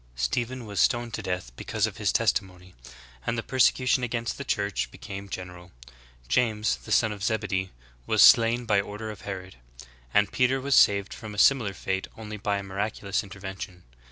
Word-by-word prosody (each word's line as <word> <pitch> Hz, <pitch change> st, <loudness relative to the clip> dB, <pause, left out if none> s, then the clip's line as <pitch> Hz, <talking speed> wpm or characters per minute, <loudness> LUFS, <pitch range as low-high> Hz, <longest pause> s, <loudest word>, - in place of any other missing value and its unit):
* -, -, -30 dB
Stephen 120 Hz, -, -2 dB
was 100 Hz, -3 st, -4 dB
stoned 120 Hz, +3 st, +2 dB
to -, -, -3 dB
death 90 Hz, -10 st, -4 dB
because -, -, -1 dB
of -, -, -5 dB
his -, -, +1 dB
testimony;^ 90 Hz, -1 st, -1 dB, 0.5 s
and 115 Hz, -, 0 dB
the 115 Hz, -, -2 dB
persecu 130 Hz, 0 st, +2 dB
tion 125 Hz, +1 st, +3 dB
against 115 Hz, 0 st, -2 dB
the -, -, -3 dB
Church 100 Hz, -6 st, -1 dB
became 100 Hz, 0 st, -8 dB
general.^ 90 Hz, -1 st, -8 dB, 0.6 s
James, 110 Hz, -, +1 dB
the -, -, -11 dB
son 110 Hz, -2 st, +3 dB
of 105 Hz, -1 st, -7 dB
Zebedee, 100 Hz, -4 st, -1 dB, 0.4 s
was -, -, +5 dB
slain 115 Hz, +1 st, +6 dB
by 105 Hz, -3 st, +3 dB
order 105 Hz, +2 st, -6 dB
of 105 Hz, -, -11 dB
Herod/ 95 Hz, -4 st, -7 dB, 0.5 s
and 105 Hz, +5 st, +3 dB
Peter 130 Hz, +1 st, +2 dB
was 140 Hz, +1 st, -1 dB
saved 100 Hz, -1 st, +4 dB
from 110 Hz, -2 st, -8 dB
a -, -, -10 dB
similar 110 Hz, -4 st, +4 dB
fate 95 Hz, +1 st, -2 dB
only 105 Hz, -1 st, -7 dB
by 100 Hz, 0 st, -1 dB
a 100 Hz, -, -5 dB
miraculous 100 Hz, +1 st, -2 dB
intervention.'" 95 Hz, -2 st, -8 dB
105 Hz, 185 wpm, -27 LUFS, 95-115 Hz, 0.6 s, slain